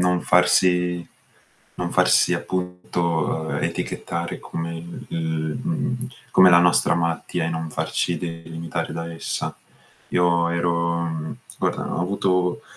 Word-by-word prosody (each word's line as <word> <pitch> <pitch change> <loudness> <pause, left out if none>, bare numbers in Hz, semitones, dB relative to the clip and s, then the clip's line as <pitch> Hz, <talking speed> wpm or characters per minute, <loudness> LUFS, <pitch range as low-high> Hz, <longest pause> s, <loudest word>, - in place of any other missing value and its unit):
non 90 -1 +2
farsi 90 -1 +3 0.7
non - - -3
farsi - - +4
appunto 90 -1 -3 0.5
uhm, - - -2
etichettare 85 0 -3
come 85 0 -5
il 85 +1 -9
il 80 0 -2
mhmm, 130 -7 -2 0.2
come 95 -1 +8
la 85 - +8
nostra 85 -1 +4
malattia 85 -1 -1
e - - 0
non 80 -1 -3
farci 85 +2 -1
delimitare 85 -1 -5
da 85 +1 -4
essa. 80 - -3 0.5
Io 85 -1 +3
ero 85 -2 -1 0.2
guarda - - -1
ho - - -1
avuto, 90 -1 +1
85 Hz, 120 wpm, -23 LUFS, 85-90 Hz, 0.7 s, come